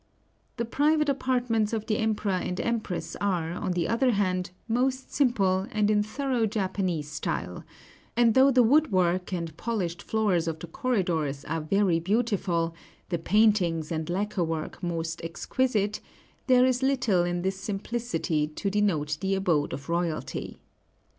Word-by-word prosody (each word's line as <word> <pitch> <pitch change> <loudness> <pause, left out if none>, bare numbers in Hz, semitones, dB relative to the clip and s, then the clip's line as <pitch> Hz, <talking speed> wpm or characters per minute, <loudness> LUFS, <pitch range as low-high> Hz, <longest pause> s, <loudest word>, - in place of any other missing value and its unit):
The 235 - -1
private 300 +5 +2
apartments 245 -5 0
of 220 -1 -2
the 215 - 0
Emperor 215 -2 0
and 180 0 -2
Empress 225 -6 -2
are, 180 -5 0
on 180 0 -2
the 175 -2 0
other 245 +2 +2
hand, 185 -3 0 0.2
most 255 +3 0
simple, 195 -8 +2
and 210 -1 +2
in 210 -1 +3
thorough 240 +1 -1
Japanese 185 -7 -1
style; 155 - -3 0.5
and 235 -2 +5
though 265 +3 +6
the 255 -2 +5
woodwork 185 - +2
and 170 -4 -3
polished 195 -7 -2
floors 200 -7 +1
of 160 -1 -2
the 160 - -7
corridors 165 - -1
are 160 +1 -2
very 180 +1 +2
beautiful, 185 -4 0 0.4
the 170 -2 -1
paintings 180 -4 +2
and 160 0 -2
lacquer 195 +1 -1
work 160 0 -4
most 165 -2 -3
exquisite, 210 +4 -1 0.5
there 255 -1 +6
is 255 0 +1
little 250 -9 +2
in 175 0 -2
this 190 0 -1
simplicity 200 -6 -2
to 175 +6 -3
denote 160 -8 0
the 195 0 +1
abode 170 -7 +1
of 140 +2 -6
royalty. 170 -1 -2
195 Hz, 145 wpm, -27 LUFS, 170-230 Hz, 0.5 s, though